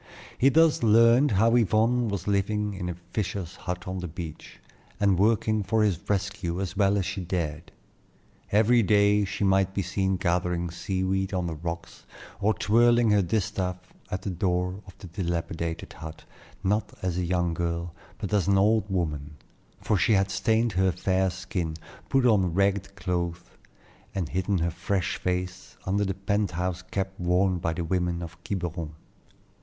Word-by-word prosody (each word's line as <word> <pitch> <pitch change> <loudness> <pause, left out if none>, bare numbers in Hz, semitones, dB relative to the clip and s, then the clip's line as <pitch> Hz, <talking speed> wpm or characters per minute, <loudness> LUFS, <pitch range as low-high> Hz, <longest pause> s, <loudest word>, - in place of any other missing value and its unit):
He 135 - +4
thus 160 +2 +4
learned 115 +5 +5
how 115 +4 +4
Yvonne 115 +2 +3
was 100 -4 -3
living 105 +1 0
in 90 -2 -4
a 90 - -4 0.2
fisher's 95 -4 -3
hut 90 -1 -5
on 95 0 -3
the 90 - -4
beach, 80 -1 -8 0.4
and 100 -3 +3
working 110 +1 +2
for 110 +2 +1
his 100 -6 +1
rescue 100 -3 -1
as 95 0 -3
well 100 0 +3
as 95 - 0
she 100 0 -3
dared. 85 -3 -3 0.8
Every 115 +3 +5
day 105 0 +4
she 100 +2 -3
might 95 0 +2
be 100 - 0
seen 95 +1 0
gathering 85 0 0
sea 95 +2 -2
weed 95 +1 0
on 90 -1 0
the 85 - -3
rocks 85 +2 -7 0.3
or 105 +2 +2
twirling 120 +1 +4
her 105 -1 +4
distaff 90 -1 -1 0.3
at 95 0 -4
the 100 - -2
door 90 +1 -1
of 95 - -14
the - - -11
dilapidated 85 -1 -3
hut, 80 0 -9 0.4
not 105 +3 0
as 90 -1 -1
a - - 0
young 85 -1 0
girl, 85 0 -2 0.2
but 105 -2 -5
as 100 -3 +2
an 100 -1 +4
old 105 +1 +3
woman; 75 -5 -2 0.5
for 105 - +1
she 110 - +3
had 95 -1 +2
stained 110 +3 +1
her 95 0 +2
fair 95 +2 +1
skin, 90 -3 -4 0.3
put 135 -1 +3
on 95 -8 +3
ragged 100 0 +1
clothes, 85 -1 -2 0.7
and 90 -5 -2
hidden 95 +2 0
her 85 0 0
fresh 95 +2 -1
face 90 0 -3
under 100 +2 +1
the 95 -1 -2
pent 100 +1 0
house 90 +1 -2
cap 95 +1 -3
worn 90 +1 +2
by 80 - -1
the 85 +1 -3
women 90 0 -1
of 85 +1 -10
Quiberon. 85 -5 -4
95 Hz, 170 wpm, -27 LUFS, 85-100 Hz, 0.8 s, learned